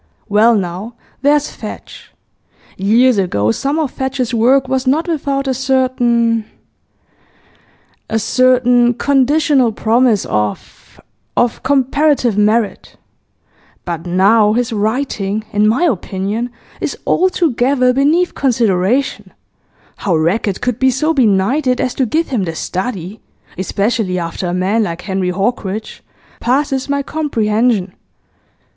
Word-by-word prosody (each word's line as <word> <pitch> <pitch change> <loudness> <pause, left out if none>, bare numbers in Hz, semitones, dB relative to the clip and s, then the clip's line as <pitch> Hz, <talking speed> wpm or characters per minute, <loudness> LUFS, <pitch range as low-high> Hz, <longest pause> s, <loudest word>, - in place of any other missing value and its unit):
Well 220 +3 +4
now, 195 +4 -4 0.3
there's 290 +1 +2
Fadge. - - -10 0.6
Years 225 +4 +3
ago 110 - 0
some 280 - -2
of 305 -5 -1
Fadge's 265 -2 -3
work 255 +4 +3
was 260 0 -1
not 305 +6 +1
without 280 -4 -2
a 265 - +1
certain 245 -3 +1 1.6
a 220 - 0
certain 245 +1 +3
conditional 280 -1 +2
promise 225 0 +2
of 105 -2 -4 0.4
of 240 -1 +1
comparative 270 -2 +1
merit; 210 +1 0 0.9
but 170 -1 -5
now 205 +4 +3
his 240 0 -1
writing, 215 -2 -2
in 210 +1 +3
my 235 +10 +2
opinion, 210 - -2 0.3
is - - -3
altogether 270 -8 +2
beneath 305 +7 +2
consideration; 235 -1 0 0.7
how 185 -4 -1
Rackett 185 +5 0
could 250 -1 -2
be 260 - +4
so 305 +6 0
benighted 250 +2 +2
as 255 - -1
to 260 - 0
give 325 +8 -1
him 225 -8 -1
The 165 -1 -5
Study 190 +2 -4 0.4
especially 200 +1 -1
after 170 +1 -4
a 175 - -2
man 195 +5 +1
like 170 -5 -3
Henry 190 -2 -2
Hawkridge 200 +2 -3 0.4
passes 270 +2 0
my 280 0 0
comprehension. 225 -9 0
235 Hz, 115 wpm, -16 LUFS, 200-265 Hz, 1.6 s, Well